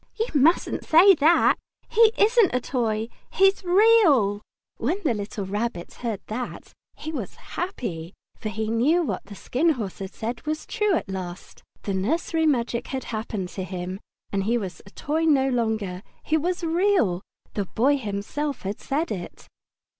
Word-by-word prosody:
"You 450 Hz, -, +1 dB
mustn't 305 Hz, +4 st, +3 dB
say 360 Hz, +5 st, +7 dB
that. 325 Hz, +1 st, +4 dB, 0.3 s
He 450 Hz, -1 st, +5 dB
isn't 430 Hz, -, +4 dB
a -, -, +3 dB
toy. 225 Hz, -3 st, -1 dB, 0.2 s
He's 390 Hz, +1 st, +3 dB
REAL!" 350 Hz, -, +5 dB, 0.4 s
When 300 Hz, -, 0 dB
the 280 Hz, -7 st, +2 dB
little 205 Hz, -1 st, -4 dB
Rabbit 205 Hz, -2 st, -3 dB
heard 225 Hz, -5 st, -4 dB
that 245 Hz, +3 st, -6 dB, 0.2 s
he 310 Hz, -, -6 dB
was 250 Hz, -, -5 dB, 0.2 s
happy, 190 Hz, -, -4 dB, 0.2 s
for 215 Hz, -, -5 dB
he 220 Hz, 0 st, -3 dB
knew 280 Hz, +10 st, +3 dB
that -, -, -1 dB
what -, -, -3 dB
the 200 Hz, 0 st, -10 dB
Skin 285 Hz, -, 0 dB
Horse 215 Hz, -8 st, -5 dB
had 195 Hz, 0 st, -7 dB
said 235 Hz, +2 st, -4 dB
was 310 Hz, 0 st, -2 dB
true 420 Hz, -4 st, +1 dB
at -, -, -2 dB
last. 185 Hz, -2 st, -7 dB, 0.2 s
The 200 Hz, -, -2 dB
nursery 320 Hz, -, 0 dB
magic 240 Hz, -3 st, 0 dB
had 265 Hz, -2 st, -4 dB
happened 215 Hz, -4 st, -3 dB
to 190 Hz, -, -5 dB
him, 185 Hz, +1 st, -5 dB, 0.3 s
and 195 Hz, -1 st, -1 dB
he 235 Hz, +3 st, +2 dB
was 190 Hz, -5 st, -5 dB
a -, -, -11 dB
toy 310 Hz, +9 st, -1 dB
no 270 Hz, -4 st, +4 dB
longer. 220 Hz, -7 st, -1 dB, 0.2 s
He 315 Hz, -, +1 dB
was 350 Hz, +3 st, -1 dB
Real. 335 Hz, -, +2 dB, 0.3 s
The 205 Hz, -, -1 dB
Boy 260 Hz, +9 st, +2 dB
himself 240 Hz, +7 st, -3 dB
had 200 Hz, +2 st, -4 dB
said 310 Hz, +5 st, -2 dB
it. 180 Hz, -4 st, -6 dB
240 Hz, 170 wpm, -25 LUFS, 205-325 Hz, 0.4 s, say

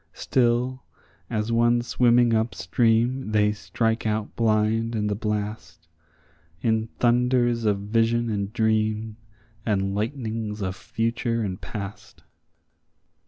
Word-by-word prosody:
Still, 125 Hz, +1 st, +1 dB, 0.5 s
as 110 Hz, 0 st, -1 dB
one 120 Hz, +1 st, +3 dB
swimming 120 Hz, 0 st, +3 dB
up 110 Hz, +1 st, 0 dB
stream, 115 Hz, +6 st, +1 dB
they 105 Hz, -1 st, +4 dB
strike 110 Hz, +5 st, -1 dB
out 110 Hz, 0 st, -2 dB
blind 115 Hz, +1 st, +1 dB
in 105 Hz, -1 st, 0 dB
the 105 Hz, -, 0 dB
blast, 105 Hz, -6 st, -4 dB, 0.8 s
In 110 Hz, -1 st, +1 dB
thunders 120 Hz, -1 st, +2 dB
of 105 Hz, -2 st, +2 dB
vision 115 Hz, +3 st, +1 dB
and 100 Hz, -1 st, -2 dB
dream, 110 Hz, -1 st, 0 dB, 0.5 s
and 95 Hz, -3 st, 0 dB
lightnings 110 Hz, -2 st, -3 dB
of 95 Hz, 0 st, -2 dB
future 115 Hz, +2 st, -2 dB
and 95 Hz, -3 st, -4 dB
past. 100 Hz, -2 st, -8 dB
110 Hz, 115 wpm, -25 LUFS, 105-120 Hz, 0.8 s, they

